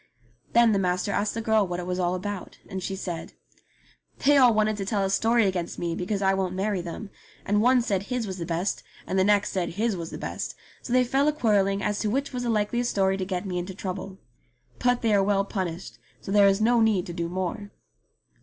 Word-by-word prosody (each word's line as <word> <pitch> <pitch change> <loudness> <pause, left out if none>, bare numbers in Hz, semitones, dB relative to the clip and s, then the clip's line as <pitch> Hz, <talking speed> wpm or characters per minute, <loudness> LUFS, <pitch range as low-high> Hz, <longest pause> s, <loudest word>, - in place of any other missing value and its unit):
Then 235 -1 +6
the 200 - +2
master 180 +1 0
asked 205 +1 -1
the 225 - -3
girl 220 -2 +3
what 175 0 -3
it 175 - -5
was 180 0 -2
all 180 0 +1
about, 195 +1 -5
and 190 -2 -5
she 195 +1 -3
said: 175 -3 -5 0.9
"They 290 +1 +6
all 255 -3 +7
wanted 215 0 +2
to 195 - -3
tell 200 -1 0
a 195 - 0
story 225 +3 +3
against 180 -3 -2
me 170 -1 -2
because 195 +4 -2
I 190 0 +4
won't 190 -1 -1
marry 195 -1 -1
them, 175 +4 -7 0.3
and 205 +1 +2
one 250 +1 +4
said 195 -5 0
his 245 +3 -3
was 190 -2 -6
the 170 - -3
best, 175 +4 -1 0.2
and 190 - 0
the - - +5
next 205 0 +3
said 180 -4 -2
his 215 +2 0
was 165 -2 -5
the - - -7
best, - - -5 0.3
so - - -8
they 255 0 +5
fell 270 +4 +1
a - - +5
quarrelling 200 -8 +1
as 210 0 -1
to 215 - 0
which 275 +5 -1
was 250 - -2
the 245 - -2
likeliest 230 +3 0
story 195 -1 +2
to 190 -1 -3
get 185 0 -3
me 180 -2 -2
into 180 +1 -6
trouble. 190 0 -5 0.6
But 245 -1 +1
they 225 -2 +3
are 200 - +4
well 195 0 +2
punished, 175 - -5 0.2
so - - -7
there 200 0 +6
is 195 +1 +3
no 235 +2 +3
need 215 -5 +2
to 175 - -6
do 170 -1 -3
more." 185 +3 -3
195 Hz, 240 wpm, -26 LUFS, 185-220 Hz, 0.9 s, all